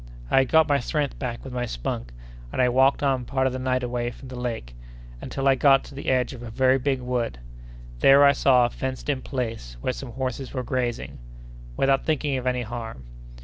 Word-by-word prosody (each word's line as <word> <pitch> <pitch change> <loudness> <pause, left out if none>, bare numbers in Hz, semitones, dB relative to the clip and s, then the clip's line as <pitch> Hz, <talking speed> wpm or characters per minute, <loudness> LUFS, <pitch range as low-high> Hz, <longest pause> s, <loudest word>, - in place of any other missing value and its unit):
I - - +6
had 130 - +1
got 160 -1 +5
my 145 -2 +3
strength 145 +2 -2
back 120 -3 -4
with 130 - -8
my 125 -1 -2
spunk, - - -4 0.4
and - - -4
I 125 -1 +4
walked 130 +3 +3
on 135 -3 +1
part 130 +2 -1
of 130 - +1
the 130 - -3
night 130 0 0
away 120 -1 -2
from 130 +2 -11
the 130 - -7
lake, 115 - -4 0.5
until 135 0 -2
I 135 - +6
got 135 0 +4
to - - -12
the 140 - -4
edge 130 0 +1
of 125 - -10
a 120 - -7
very 130 +3 +3
big 135 0 0
wood. 125 - -2 0.6
There 140 - +7
I 140 - +7
saw 130 -3 +4
a 120 - -2
fenced 130 +2 -4
in 135 -3 0
place, 115 - -4
where 130 - -1
some 125 -3 -8
horses 130 +1 -4
were 130 - -2
grazing, 120 - -3 0.6
without 135 0 +2
thinking 150 -3 0
of 130 0 -4
any 125 -1 0
harm. 115 - -7
130 Hz, 220 wpm, -25 LUFS, 120-135 Hz, 0.6 s, There